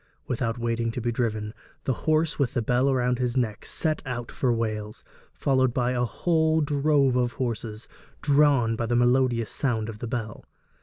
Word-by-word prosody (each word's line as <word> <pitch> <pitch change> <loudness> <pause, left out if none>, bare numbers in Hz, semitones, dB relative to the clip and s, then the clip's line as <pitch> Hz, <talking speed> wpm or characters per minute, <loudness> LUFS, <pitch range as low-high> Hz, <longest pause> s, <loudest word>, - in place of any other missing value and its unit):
Without 120 -2 -2
waiting 115 -1 -1
to - - -3
be 120 0 -1
driven, 110 -3 -2 0.3
the 130 - 0 0.2
horse 155 +1 +2
with 135 -4 0
the 120 - +1
bell 125 +4 +2
about 125 -2 +1
his 125 0 -1
neck 110 -5 -1
set 155 -2 -1
out 120 -3 -5
for 130 - 0
Wales, 110 -2 -3 0.3
followed 130 -3 +1
by 125 -1 +1
a 125 -1 +1
whole 160 +5 +1
drove 145 -2 +2
of 125 -1 +1
horses, 115 -3 -4 0.3
drawn 140 -6 +3
by 115 0 -2
the 120 - +1
melodious 120 -2 +2
sound 115 -5 -1
of 105 -1 -8
the 120 - -4
bell. 110 -2 -4
120 Hz, 175 wpm, -26 LUFS, 115-135 Hz, 0.3 s, drawn